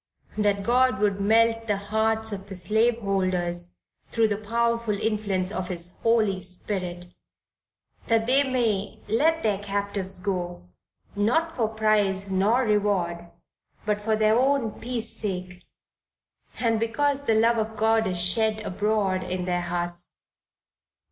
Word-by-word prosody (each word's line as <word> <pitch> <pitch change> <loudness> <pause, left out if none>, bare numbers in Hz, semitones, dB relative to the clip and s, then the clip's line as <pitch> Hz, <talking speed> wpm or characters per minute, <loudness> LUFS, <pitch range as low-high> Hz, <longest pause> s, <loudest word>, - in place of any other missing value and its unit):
that 205 -1 +1
God 255 +2 +3
would 200 -1 +1
melt 225 +2 +3
the 205 -2 +1
hearts 220 +2 0
of 200 -1 -5
the 195 - -6
slaveholders 185 -4 0 0.3
thro' 230 -1 +1
the 210 -1 +1
powerful 230 0 -1
influence 200 -4 -1
of 185 -4 -3
his 175 -1 -1
Holy 215 -5 +2
Spirit 180 -1 -5 0.9
that 225 -1 +2
they 260 +4 +4
may 235 -7 -1
"let 320 +9 +2
their 210 -3 +1
captives 200 -1 -3
go," 180 - -4 0.5
"not 320 +11 +1
for 230 -4 +1
price 210 -3 +1
nor 210 +7 +2
reward," 195 -6 0 0.6
but 210 -1 0
for 220 +1 +1
their 215 0 +3
own 265 -4 +2
peace 240 -1 -4
sake 180 -3 -5 0.9
and 225 -2 +1
because 280 +5 0
the 225 - +3
love 230 +1 +3
of 220 0 -3
God 220 0 +2
is 180 -2 -1
shed 215 +5 +3
abroad 200 -1 0
in 180 0 -3
their 175 -1 0
hearts. 175 0 -5
210 Hz, 135 wpm, -25 LUFS, 185-225 Hz, 0.9 s, they